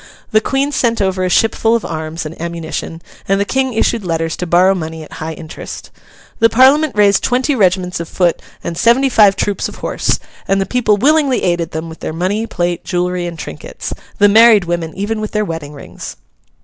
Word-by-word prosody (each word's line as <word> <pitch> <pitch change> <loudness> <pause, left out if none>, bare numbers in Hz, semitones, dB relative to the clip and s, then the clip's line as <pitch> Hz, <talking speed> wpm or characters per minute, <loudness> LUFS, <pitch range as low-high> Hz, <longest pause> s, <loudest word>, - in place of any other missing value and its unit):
The 215 - +4
Queen 275 +5 0
sent 235 -5 +1
over 190 -2 0
a 185 - 0
ship 225 +5 +3
full 225 +1 +2
of 230 - -2
arms 160 0 -5
and 155 - -6
ammunition, 170 0 -5 0.2
and 195 0 +2
the 200 - +1
King 265 +2 0
issued 225 0 +1
letters 165 -2 -2
to 180 - -4
borrow 180 +3 +4
money 160 -3 -5
at - - -14
high 160 +1 -4
interest. 160 0 -9 0.5
The 230 -1 +5
Parliament 270 +5 +4
raised 200 -1 +4
twenty 255 +4 +1
regiments 185 -6 +1
of 170 - -6
foot 175 -2 +1 0.2
and 170 - -4
seventy 240 +8 +3
five 205 -5 +5
troops 205 -1 -1
of - - -11
horse; - - -1 0.3
and 195 0 +2
the 195 - 0
people 215 -4 +1
willingly 280 +2 +2
aided 175 -2 0
them 160 0 -5
with 160 0 -10
their - - -5
money, 195 +7 -1
plate, 175 -3 -2
jewellery, 180 0 -1
and 170 -1 -7
trinkets—the 150 - -3
married 220 -2 +6
women 170 -1 -2
even 210 +3 -2
with 215 - -5
their 210 0 0
wedding 160 -4 -6
rings. 140 - -9
190 Hz, 200 wpm, -16 LUFS, 170-225 Hz, 0.5 s, married